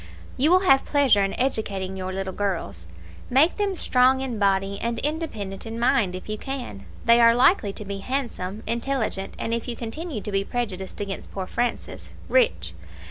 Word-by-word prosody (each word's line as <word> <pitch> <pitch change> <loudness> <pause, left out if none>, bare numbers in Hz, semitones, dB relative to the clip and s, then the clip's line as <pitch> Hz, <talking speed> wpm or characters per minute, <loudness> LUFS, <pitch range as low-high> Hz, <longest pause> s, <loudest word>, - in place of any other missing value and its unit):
"You 285 +5 +3
will 365 +1 +5
have 270 -8 +5
pleasure 275 -8 +3
in 195 - -2
educating 200 -7 -1
your 185 0 -4
little 190 0 -4
girls. 165 - -3 0.4
Make 280 +7 +4
them 405 -2 0
strong 260 -4 +3
in 255 -5 -3
body 195 0 +1
and 235 0 -2
independent 230 - -3
in 225 +1 -5
mind 235 -6 +2
if 185 - -8
you 215 0 -4
can. 270 -7 -6 0.2
They 235 +1 +6
are 230 0 +6
likely 245 - +4
to 210 - -7
be 200 0 -5
handsome, 220 -5 -4
intelligent, 235 -4 -2
and, 230 - -2
if 235 +1 -2
you 240 - -3
continue 250 +4 -5
to 210 - -5
be 195 0 +1
prejudiced 200 -5 -4
against 200 -1 -5
poor 190 -1 -4
Francis, 240 +5 -3 0.2
rich. - - +2
230 Hz, 180 wpm, -24 LUFS, 195-265 Hz, 0.4 s, They